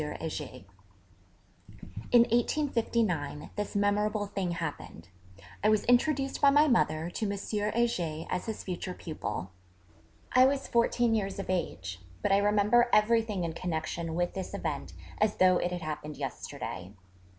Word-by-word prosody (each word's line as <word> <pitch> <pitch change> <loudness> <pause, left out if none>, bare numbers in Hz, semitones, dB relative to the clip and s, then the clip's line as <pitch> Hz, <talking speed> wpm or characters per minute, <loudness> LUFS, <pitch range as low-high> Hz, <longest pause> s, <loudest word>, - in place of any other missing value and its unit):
Heger_. 150 -5 -5 1.5
In 240 - +8
1859 230 - 0
this 205 -1 -4
memorable 205 +1 +1
thing 195 -3 -2
happened: 90 - -6 0.5
I 210 - +5
was 215 -1 +3
introduced 270 +2 +2
by 280 - +7
my 295 +2 +5
mother 165 - +1
to 205 +2 -2
M. 200 - -3
Heger 205 -6 -1
as 180 - -3
his 220 - -4
future 180 0 -4
pupil. 100 - -5 0.8
I 255 +1 +7
was 275 0 -1
fourteen 235 0 +2
years 195 -3 -1
of 195 -1 -3
age: 95 - -3 0.2
but - - +1
I 195 - +6
remember 210 +4 +3
everything 215 -2 +3
in 165 -1 -2
connection 165 -1 -3
with 175 0 0
this 190 -1 -5
event - - -4 0.3
as 215 0 +2
though 185 -1 +5
it 175 - -1
had 175 -2 -4
happened 150 -1 -5
yesterday. 100 -8 -6
200 Hz, 140 wpm, -30 LUFS, 165-230 Hz, 1.5 s, In